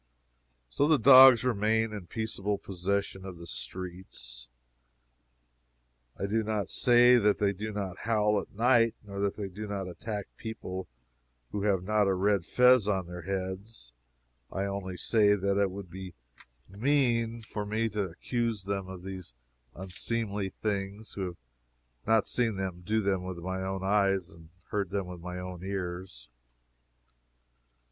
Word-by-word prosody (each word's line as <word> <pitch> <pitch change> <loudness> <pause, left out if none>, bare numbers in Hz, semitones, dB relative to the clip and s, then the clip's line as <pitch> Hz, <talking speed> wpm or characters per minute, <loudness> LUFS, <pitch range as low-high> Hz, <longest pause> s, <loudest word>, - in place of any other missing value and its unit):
So 140 - +1
the 155 -1 +5
dogs 130 -3 +9
remain 110 -1 +1
in 100 -5 -7
peaceable 105 -2 -2
possession 95 +1 -2
of 95 -2 -8
the 85 - -10
streets. 85 -10 -6 1.7
I - - -2
do 110 +3 +1
not 105 -3 -2
say 120 0 +6
that 105 -3 +3
they 100 -1 +1
do 105 +3 -5
not 100 -3 -4
howl 105 -2 +2
at - - -13
night, 115 +1 +3
nor 100 -1 -7
that 100 -1 0
they 100 -2 -4
do 105 +3 -7
not 100 -2 -3
attack 100 +3 -5
people 95 -4 -6 0.6
who 105 - -2
have 95 -3 +2
not 105 +1 +2
a 95 - +2
red 100 -1 +1
fez 125 -4 +5
on 95 -3 0
their 90 0 -8
heads. 95 - -5 0.6
I 95 - -2
only 100 -2 -4
say 105 -1 +4
that 100 0 +1
it 100 - +2
would 95 -2 -8
be 95 -1 -8 0.5
mean 115 0 +1
for 105 -1 -4
me 110 +2 0
to 105 0 -2
accuse 110 +4 -2
them 100 -1 -3
of 95 -1 -9
these 95 -9 -8 0.4
unseemly 100 +2 -2
things 100 +1 -4
who 95 - -3
have 90 -1 -6 0.7
not 110 -2 +3
seen 115 -4 +1
them 95 -2 -4
do 110 +4 +1
them 95 -2 0
with 90 -1 -5
my 95 +2 -4
own 95 0 -3
eyes 95 -3 +1
or 85 - -15 0.3
heard 100 -3 -1
them 100 0 -2
with 90 -1 -9
my 90 +1 -6
own 90 -1 -7
ears. 90 -9 -5
100 Hz, 155 wpm, -29 LUFS, 95-110 Hz, 1.7 s, dogs